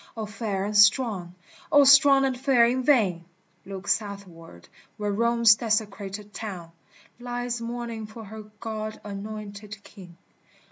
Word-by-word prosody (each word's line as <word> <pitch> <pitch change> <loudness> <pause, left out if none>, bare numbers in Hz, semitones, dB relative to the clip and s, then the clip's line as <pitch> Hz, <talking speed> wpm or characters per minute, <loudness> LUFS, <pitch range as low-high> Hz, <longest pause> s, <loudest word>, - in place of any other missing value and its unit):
O 220 - -3
Fair 210 -2 -4
and 210 +1 -4
Strong! 205 -4 +3 0.4
O 290 -1 +7
Strong 280 0 +6
and 265 -1 -1
Fair 250 -2 +3
in 250 +2 0
vain! 210 - +2 0.4
Look 195 0 -8
southward 195 - -4 0.3
where 210 -1 -2
Rome's 235 +1 +4
desecrated 210 -2 -3
town 185 -6 -7 0.5
Lies 245 0 -4
mourning 230 -2 -5
for 220 +1 -11
her 215 +1 -10
God 215 -1 -5
anointed 205 0 -8
King 180 -4 -14
215 Hz, 130 wpm, -25 LUFS, 200-235 Hz, 0.5 s, O